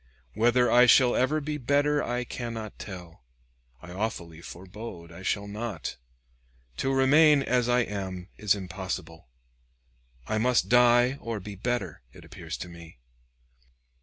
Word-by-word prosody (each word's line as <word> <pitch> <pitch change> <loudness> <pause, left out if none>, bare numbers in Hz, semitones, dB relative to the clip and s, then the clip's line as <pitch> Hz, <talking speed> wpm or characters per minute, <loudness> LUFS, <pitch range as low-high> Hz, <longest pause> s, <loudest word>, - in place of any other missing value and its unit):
Whether 120 - +3
I 125 +1 +7
shall 125 0 +6
ever 145 +5 +2
be 150 0 -4
better 145 +3 +2
I 120 +1 -2
cannot 115 -3 -6
tell; 90 -8 -9 0.6
I 90 - -10
awfully 90 -5 -4
forebode 90 -1 -9
I 85 +3 -11
shall 100 +1 -1
not. 105 -5 -5 0.8
To 135 - 0
remain 140 +2 +5
as 125 -2 +1
I 120 0 +4
am 95 -4 -5
is 105 -1 +2
impossible; 95 -5 -6 1.0
I 110 - -1
must 125 +2 +2
die 125 +2 +5
or 115 -2 -4
be 100 +2 -8
better, 100 - -3
it - - -14
appears - - -7
to - - -12
me. 85 -4 -13
110 Hz, 135 wpm, -27 LUFS, 95-125 Hz, 1.0 s, I